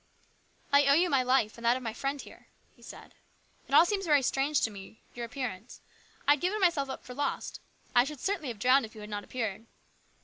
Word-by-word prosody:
" - - -32
I 285 0 +6
owe 280 - +6
you 350 +3 +2
my 270 -2 +4
life, 250 -3 +1
and - - -12
that 240 +2 +4
of 260 - -9
my 225 -2 -3
friend 275 +4 -3
here," - - -13 0.3
he - - -24
said. - - -12 0.5
"It - - 0
all - - +8
seems 390 0 -2
very 290 -3 +4
strange 275 +3 +1
to 225 - 0
me, 200 +1 -12
your 240 -1 -5
appearance. 240 -4 -6 0.5
I - - +7
had 290 - +3
given 380 +4 0
myself 335 -8 +2
up 265 - -6
for 250 - -8
lost. 285 +3 -3 0.3
I 245 - +6
should 290 +1 -7
certainly 385 -4 -2
have 235 -3 -5
drowned 255 +6 +4
if 220 0 -9
you 215 - -10
had 210 0 -9
not 205 0 -4
appeared." 225 -2 -4
265 Hz, 235 wpm, -29 LUFS, 230-290 Hz, 0.5 s, all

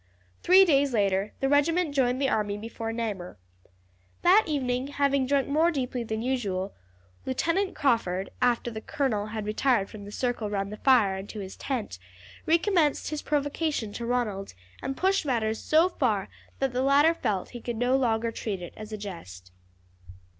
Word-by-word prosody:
Three 375 +2 +7
days 280 -5 +3
later 200 -1 +1
the 270 - +2
regiment 300 +3 +2
joined 255 -2 +1
the 275 - +2
army 205 -4 0
before 225 +1 -5
Namur. 210 -6 -4 0.9
That 385 +5 +6
evening, 260 -3 -1
having 280 -2 +1
drunk 280 0 +2
more 310 +4 +3
deeply 255 -5 -2
than 220 0 -3
usual, 205 -7 -2 0.5
Lieutenant 335 +9 0
Crawford, 200 -9 0
after 240 -1 +1
the 220 -1 -6
colonel 220 -6 -1
had 215 -1 -5
retired 215 -1 +1
from 205 -2 -9
the 205 - -9
circle 240 -2 -2
round 200 0 -2
the - - -7
fire 225 -8 +4
and 195 +1 -8
to 215 - -7
his 190 -1 -7
tent, 230 - -4 0.5
recommenced 330 -3 +2
his 305 - -3
provocation 290 -5 -1
to 235 - -5
Ronald, 210 - -2 0.3
and 270 - -4
pushed 385 0 +2
matters 225 -6 0
so 320 +3 +4
far 220 - 0 0.3
that 270 -2 -1
the 250 - 0
latter 285 +4 +5
felt 200 - -2
that - - -18
he 240 - -7
could 240 -1 -4
no 245 +3 +2
longer 230 -3 +1
treat 210 -4 -4
it 175 -1 -8
as 215 0 -9
a 215 - -4
jest. 95 - -9
245 Hz, 175 wpm, -27 LUFS, 210-280 Hz, 0.9 s, Three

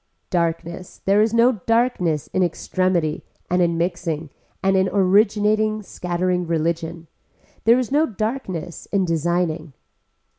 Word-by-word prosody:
Darkness, 170 0 -2
there 200 +2 +4
is 220 0 +2
no 230 -2 +3
darkness 225 - +1
in 185 - +1
extremity 175 -2 0 0.3
and 180 0 +3
in 170 -1 +2
mixing 165 -3 -2 0.3
and 195 0 +3
in 190 0 +3
originating 210 +2 +2
scattering 180 -1 -2
religion. 165 0 -2 0.6
There 230 +2 +6
is 255 -2 -2
no 305 +3 +3
darkness 215 -6 -4
in 195 -2 +1
designing. 165 -2 -1
180 Hz, 120 wpm, -22 LUFS, 170-210 Hz, 0.6 s, There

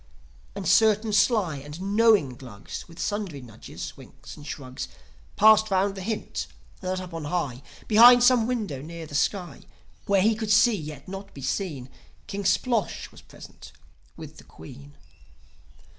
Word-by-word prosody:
And 200 -2 -5
certain 215 +2 +3
sly 200 - +2
and 145 +4 -9
knowing 200 - +3
Glugs, 120 -6 -9
With 165 -1 -15
sundry 205 -9 -3
nudges, 105 - -9
winks - - -13
and 145 0 -12
shrugs, 130 -3 -6 0.5
Passed 220 0 +6
round 195 +1 +1
the 195 - -8
hint 215 +3 -4 0.3
that 185 0 -3
up 180 -2 -9
on 165 -2 -5
high, 145 -6 -3 0.3
Behind 240 +3 +8
some 245 -2 +4
window 210 - -3
near 165 +2 -8
the 150 - -13
sky, 175 +1 -1 0.5
Where 195 -2 +3
he 220 +2 +4
could 220 0 -4
see 215 +2 +5
yet 150 -6 -8
not 195 +1 -9
be 135 - -9
seen, 145 -5 -3 0.4
King 200 0 -5
Splosh 220 +3 0
was - - -15
present - - -14 0.4
with - - -11
his - - -17
Queen. 70 +1 -13
190 Hz, 155 wpm, -25 LUFS, 145-215 Hz, 0.5 s, Behind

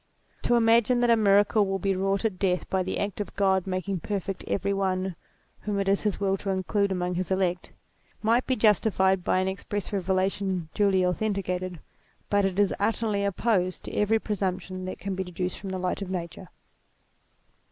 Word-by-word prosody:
To 240 - +2
imagine 235 +1 +4
that 240 -1 +4
a - - +7
miracle 205 0 +4
will 195 0 0
be 195 0 0
wrought 195 +3 0
at 195 -5 -1
death 180 -2 0
by 190 - +2
the - - -2
act 205 0 -2
of 205 - -7
God 190 -2 +2
making 185 0 -2
perfect 195 +1 -4
every 200 0 0
one 190 -2 -1 0.4
whom 205 -1 -2
it 195 - -1
is 195 0 +2
his 210 -3 -1
will 195 -1 +1
to 195 - -5
include 195 +1 0
among 180 -1 -1
his 180 +1 -2
elect, 185 -2 0 0.5
might 230 +3 +2
be 260 - +2
justified 195 -4 +3
by - - +2
an 185 0 +1
express 200 +2 -4
revelation 190 -2 0
duly 195 -3 +3
authenticated, 185 -2 -2 0.5
but 205 -1 +3
is 195 +1 +2
utterly 210 -1 0
opposed 200 -2 0
to - - -7
every 210 +2 +2
presumption 185 -3 -3
that 185 - -5
<jan 195 0 -3
be 190 0 -2
deduced 180 0 -4
from 195 - -6
the 190 - -3
light 180 +2 -2
of 195 - -3
Nciture. 175 -3 -5
195 Hz, 185 wpm, -27 LUFS, 185-205 Hz, 0.5 s, a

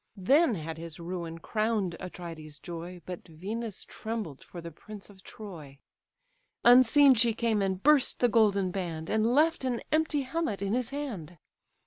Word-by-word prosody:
Then 270 - +4
had 160 -1 -6
his 165 -1 -8
ruin 170 -1 -5
crown'd 215 -1 -1
Atrides' 165 -4 -8
joy, 175 0 -8
But 180 -1 -7
Venus 205 +6 -5
trembled 220 -11 -6
for 175 - -9
the 170 0 -8
prince 205 +5 -12
of 190 -1 -18
Troy: 160 -10 -10 0.9
Unseen 255 +3 +7
she 230 -1 +2
came, 225 -3 +1
and 190 -1 -1
burst 295 -2 +4
the 245 - +4
golden 205 -4 +3
band; 170 -4 -4
And 220 +1 +2
left 305 +5 +3
an 250 -3 -1
empty 310 -1 +2
helmet 270 -5 -2
in 200 +1 -1
his 250 0 0
hand. 230 - -6
205 Hz, 155 wpm, -29 LUFS, 170-240 Hz, 0.9 s, Unseen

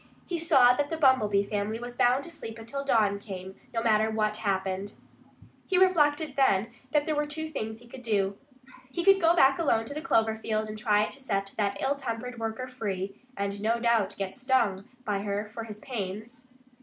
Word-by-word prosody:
He 345 -2 -3
saw 270 -7 +6
that 285 +3 -1
the 325 - -2
Bumblebee 220 -9 +4
family 205 +1 -2
was 240 +1 -7
bound 250 +3 +3
to 340 - -8
sleep 225 -8 -7
until 235 +5 -5
dawn 210 -7 +2
came, 190 -2 -8
no 230 -1 -2
matter 220 -1 +3
what 215 -1 0
happened. 195 0 -2 0.7
He 375 - +2
reflected, 310 -5 +3
then, 230 -5 +3 0.2
that 290 +1 +2
there 310 - 0
were 295 0 0
two 315 +2 -3
things 220 -8 -5
he 240 - -16
could 250 +2 -10
do. 200 -4 0 0.5
He 345 +6 -3
could 390 -1 +6
go 335 +1 +5
back 270 -3 +5
alone 230 -9 +2
to 255 - -7
the 305 - -4
clover 225 -9 +2
field 220 -1 -2
and 215 - -6
try 210 -1 +2
to 270 - -7
set 195 -7 -2
that 200 -2 0
ill 270 - +1
tempered 250 -3 -5
worker 225 +3 -3
free 200 -6 -4 0.2
and 200 0 -3
no 230 +2 +1
doubt 230 -4 +2
get 195 -1 -4
stung 245 -6 +1 0.2
by 205 -2 0
her 205 +1 -2
for 230 -1 -5
his 210 -2 -8
pains. 230 +2 -6
225 Hz, 200 wpm, -28 LUFS, 205-270 Hz, 0.7 s, saw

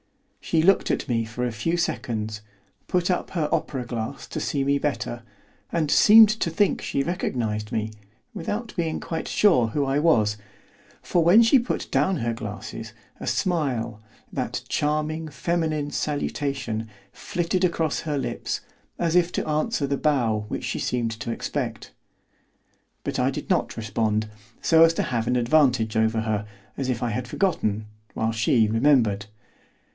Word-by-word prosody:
She 160 -1 +1
looked 195 +3 +4
at - - -1
me 115 -2 +1
for 120 +3 -3
a 120 - -1
few 140 +11 -1
seconds, 110 -10 -2 0.5
put 180 0 +1
up 180 - -1
her 160 -5 -1
opera 130 -4 -1
glass 120 +2 -5
to - - -4
see 140 -2 -1
me 140 +1 +2
better, 125 -5 -2 0.5
and 155 -3 0
seemed 220 +1 +8
to 215 -5 0
think 200 +5 +1
she 140 - -1
recognised 115 - -2
me, 110 0 -2 0.4
without 210 +4 -4
being 165 -3 -1
quite 165 -1 -4
sure 170 - +4
who 140 +5 -1
I 135 +2 +1
was, 110 -10 +3 0.7
for 175 - +2
when 190 +8 +7
she 245 +4 +5
put 240 - -3
down 190 -1 +2
her 120 -3 -1
glasses, 110 -2 -7 0.3
a - - -6
smile, 125 - -1 0.3
that - - -3
charming, 155 +2 -1
feminine 155 0 -1
salutation, 135 -6 -2 0.2
flitted 175 +1 -2
across 165 -4 +1
her 150 -3 -2
lips, 135 - -3 0.4
as 170 -1 0
if 175 -1 +4
to - - -2
answer 155 +2 0
the 140 0 -1
bow 120 -9 +1
which - - -4
she - - -2
seemed 120 -2 -1
to 115 +1 -5
expect; - - -4 1.1
but - - -2
I - - +3
did - - -5
not - - 0
respond, 110 0 0 0.3
so 165 -1 +6
as 165 0 +5
to - - 0
have 115 -2 -2
an 125 - +2
advantage 125 -3 +3
over 110 0 +2
her, 105 -1 -2 0.3
as 135 -2 -3
if 120 -2 -1
I 120 - 0
had 125 +5 -3
forgotten, 110 - 0 0.3
while 110 0 0
she 110 0 +3
remembered. 115 -4 +2
140 Hz, 160 wpm, -25 LUFS, 115-165 Hz, 1.1 s, seemed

